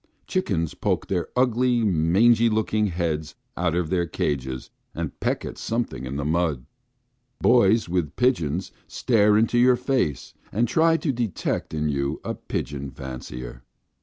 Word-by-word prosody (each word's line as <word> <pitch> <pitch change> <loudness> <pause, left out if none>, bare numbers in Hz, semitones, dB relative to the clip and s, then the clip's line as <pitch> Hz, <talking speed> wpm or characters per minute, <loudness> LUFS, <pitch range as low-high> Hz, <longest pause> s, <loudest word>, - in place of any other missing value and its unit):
Chickens 95 - -1
poke - - -1
their 90 -3 -1
ugly, 125 -1 +2
mangy 105 +6 +4
looking 110 -1 +1
heads 85 -4 -2 0.2
out 90 -1 0
of 85 -3 -1
their 85 -2 +1
cages 65 -5 -3 0.2
and - - -5
peck - - -1
at - - -7
something 115 - -3
in 65 - -5
the 70 0 -2
mud. 80 -5 0 0.7
Boys 115 -3 +4
with 85 -4 -1
pigeons 95 - 0 0.2
stare 105 -3 +3
into 115 +2 +2
your 125 +1 +6
face 125 - -1 0.2
and 115 +4 +1
try 165 +6 +3
to 155 - -1
detect 120 -7 -2
in 75 -1 -1
you 70 -1 -1
a - - -3
pigeon 70 -1 -4
fancier. 65 -2 -8
90 Hz, 145 wpm, -24 LUFS, 75-120 Hz, 0.7 s, your